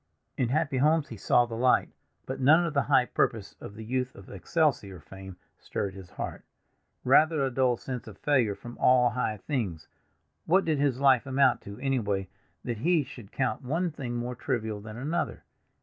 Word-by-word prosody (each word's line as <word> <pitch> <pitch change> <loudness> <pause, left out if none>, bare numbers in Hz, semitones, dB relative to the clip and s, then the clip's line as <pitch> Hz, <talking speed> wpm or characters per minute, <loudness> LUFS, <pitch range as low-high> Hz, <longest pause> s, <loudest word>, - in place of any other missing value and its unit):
"In 125 - 0
happy 145 0 0
homes 155 +3 +2
he 115 - -7
saw 120 +4 +3
the 120 - -9
light," 125 +3 +2 0.3
but - - -5
none 155 +6 +5
of 165 - -3
the 140 - +3
high 135 -3 +3
purpose 110 -4 -1
of 100 - -9
the 110 0 -8
youth 125 +2 -2
of 100 - -13
"Excelsior" 100 - 0
fame 95 +3 -11 0.2
stirred 100 -2 -4
his 95 -2 -11
heart—rather 150 - -1
a 135 - -2
dull 125 -1 +2
sense 125 -2 -6
of - - -10
failure 125 -8 +1
from 120 +3 -11
all 125 -1 +4
high 115 -3 -2
things. 100 - -3 0.6
What 190 +4 +4
did 155 -3 0
his 140 -3 +1
life 135 -2 +4
amount 130 -1 +3
to, 100 0 -8
anyway, 110 -8 -1 0.3
that 120 -3 -4
he 165 +3 +2
should 120 -6 -12
count 130 -5 -1
one 165 +7 -1
thing 130 -5 -5
more 120 +1 -3
trivial 110 -3 -3
than 110 +1 -9
another? 150 +7 -3
125 Hz, 180 wpm, -28 LUFS, 110-140 Hz, 0.6 s, none